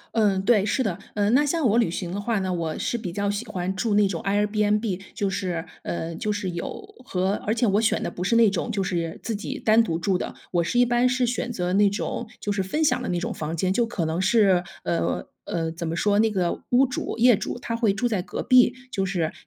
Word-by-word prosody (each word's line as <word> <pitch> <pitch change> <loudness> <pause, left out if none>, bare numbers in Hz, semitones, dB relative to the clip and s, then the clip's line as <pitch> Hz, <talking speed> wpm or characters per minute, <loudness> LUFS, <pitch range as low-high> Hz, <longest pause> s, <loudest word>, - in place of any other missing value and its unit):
嗯， 200 -4 +3
对， 210 -3 +4
是 260 - 0
的。 195 -7 -1 0.2
嗯， 205 +2 +2
那 290 +3 +5
像 300 -3 +1
我 220 +2 +3
旅 200 -8 +2
行 175 -1 -4
的 200 +3 -3
话 225 -1 0
呢， 185 -1 -2
我 165 -2 -3
是 240 - -1
比 180 -6 -5
较 200 +2 -1
喜 205 +4 -2
欢 190 -2 -3
住 210 0 0
那 205 -1 +4
种 170 -4 -3
airbnb 210 0 +1
就 200 -1 -1
是 180 -4 -3 0.2
呃， 165 -1 -4
就 210 +5 -2
是 205 -3 -2
有 405 - -7
和 190 -3 0
而 215 - +1
且 235 0 +1
我 205 +2 +3
选 225 - +1
的 - - -2
不 180 - -5
是 230 +5 +2
那 225 -3 +6
种 205 +5 -2
就 200 -2 -1
是 170 -3 -2
自 225 -2 -3
己 270 +7 -5
单 225 -1 +4
独 165 -5 -2
住 185 +2 +1
的， - - -5 0.2
我 175 -2 +2
是 240 +9 0
一 245 - +6
般 240 +1 +3
是 250 -1 +1
选 245 0 -2
择 180 -4 -2
那 200 0 +5
种 220 +3 -4
就 205 - -5
是 195 -2 -1
分 245 +12 -2
享 - - +1
的 - - -3
那 175 -1 0
种 - - -3
房 160 +2 -4
间， 185 +2 +1
就 235 +2 +2
可 200 -8 -3
能 160 +3 -1
是， 190 -3 +4 0.2
呃， 85 -1 -1 0.2
呃， 165 -1 -2
怎 170 0 -5
么 165 +1 -2
说？ 205 +2 +2
那 220 0 +3
个 180 -4 -1
屋 255 +2 +5
主 250 -2 -4
业 240 -1 +6
主 240 - -4
他 230 -1 -3
会 225 -4 +2
住 245 +4 0
在 210 -6 0
隔 - - -5
壁， 250 0 +5 0.2
就 195 -5 -1
是 175 -4 -1
205 Hz, 285 characters per minute, -24 LUFS, 180-230 Hz, 0.2 s, 那